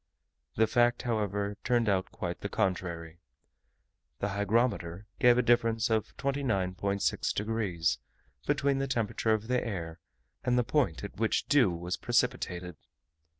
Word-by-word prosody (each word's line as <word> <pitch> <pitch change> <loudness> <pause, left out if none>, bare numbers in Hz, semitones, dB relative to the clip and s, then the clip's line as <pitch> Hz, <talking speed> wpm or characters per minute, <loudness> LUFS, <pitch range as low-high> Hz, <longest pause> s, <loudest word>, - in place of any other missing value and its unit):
The 110 - +4
fact, 120 +1 +2
however, 105 -3 -1
turned 120 -2 +2
out 95 -2 +1
quite 90 -1 -4
the - - -3
contrary. 85 -3 -2 1.0
The 100 - -2
hygrometer 100 -3 0
gave 120 0 +6
a 125 - +3
difference 115 -1 +2
of 110 -1 -1
29.6 100 -8 0
degs., 105 -6 0 0.5
between 140 -1 +2
the 135 - -1
temperature 115 -2 0
of 110 0 -6
the 125 0 +1
air, 85 -7 -5 0.4
and 125 0 +2
the 125 - +3
point 120 - 0
at 100 - -7
which 110 0 +1
dew 140 -8 +4
was 90 +1 -3
precipitated. 90 -2 -1
105 Hz, 135 wpm, -30 LUFS, 95-120 Hz, 1.0 s, gave